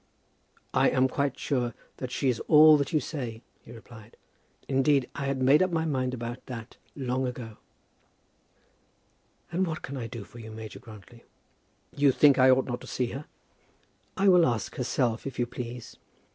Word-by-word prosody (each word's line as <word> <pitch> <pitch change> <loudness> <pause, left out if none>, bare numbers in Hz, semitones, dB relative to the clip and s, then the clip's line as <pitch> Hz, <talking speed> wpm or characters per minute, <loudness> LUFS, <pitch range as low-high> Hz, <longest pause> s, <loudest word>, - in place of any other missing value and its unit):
"I - - +4
am 130 0 +3
quite 140 0 -2
sure 125 -5 -1 0.2
that 130 - -5
she 130 +2 -2
is 125 -3 +1
all 155 0 +8
that 140 -2 -2
you 155 - +2
say," 125 -7 -6 0.2
he - - -14
replied. 115 -1 -14 0.5
"Indeed 135 -1 +2
I 140 - -4
had 135 -1 -1
made 140 +5 +5
up 185 - +3
my 165 -2 -1
mind 130 -4 -1
about 120 0 -6
that 115 -4 -8 0.2
long 130 -1 -1
ago." 120 -3 -7 1.9
"And 185 +2 0
what 160 -1 -5
can 135 +1 -6
I 115 -3 -4
do 115 -3 -7
for 120 - -14
you, 110 -1 -9
Major 110 0 -9
Grantly?" 110 +2 -14 0.7
"You 140 -1 +4
think 140 0 +5
I 130 +1 +6
ought 130 0 +4
not 125 0 -4
to - - -11
see 125 -2 -2
her?" 140 +5 -6 0.9
"I 195 +1 +2
will 180 -3 +6
ask 115 -4 -2
herself, 125 -1 -1
if 135 - -7
you 120 - +1
please. 120 -1 -8
130 Hz, 175 wpm, -27 LUFS, 120-140 Hz, 1.9 s, all